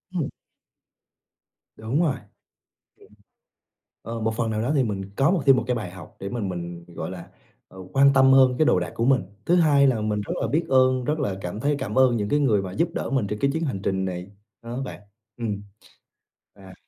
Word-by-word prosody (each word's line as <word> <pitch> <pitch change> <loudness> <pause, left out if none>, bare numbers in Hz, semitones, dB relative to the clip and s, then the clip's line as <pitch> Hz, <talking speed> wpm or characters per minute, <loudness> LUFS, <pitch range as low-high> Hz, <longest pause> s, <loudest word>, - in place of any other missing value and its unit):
Ừm. 160 -6 -1 1.5
Đúng 115 +8 -1
rồi. 155 -5 +2
Ừm. 125 - -13 1.9
Ờ, 115 - -4
một 110 0 -1
phần 115 -1 -1
nào 110 0 -1
đó 125 +5 0
thì 140 - +3
mình 100 -4 -3
có 135 +4 +3
một 180 -5 +1
thêm 135 -1 +7
một - - -1
cái 125 0 0
bài 105 -6 -4
học 90 -3 -12
để 100 - -4
mình 110 -3 -3
mình, 85 -1 -6
gọi - - -5
là, 90 -2 -9 0.4
ờ, 95 - -15
quan 140 +1 +6
tâm 135 0 +6
hơn 130 -1 +6
cái 155 - +4
đồ 90 - +3
đạc 90 -1 -4
của 115 - -1
mình. 130 -1 +3 0.2
Thứ 175 - +4
hai 150 -5 +5
là 125 -5 +2
mình 105 -1 -1
rất 100 - -4
là - - 0
biết 160 +4 0
ơn, 130 -1 +3
rất 150 +5 -1
là 115 -9 -1
cảm 90 +3 -5
thấy 145 +3 +1
cảm 105 - -4
ơn 130 -2 +5
những 105 -2 -2
cái 145 - +2
người 110 -8 +2
mà 95 -1 -6
giúp 165 - +1
đỡ - - -3
mình 135 -6 +1
trên 105 +1 -4
cái 140 +5 +1
chuyến 160 +2 -2
hành 130 -11 -3
trình 95 -1 -1
này 90 0 -5 0.3
đó 120 +3 -5
bạn. 130 - -8 0.4
Ừm, 105 -4 -3 0.9
à. 95 -2 -14
115 Hz, 225 wpm, -24 LUFS, 100-135 Hz, 1.9 s, thêm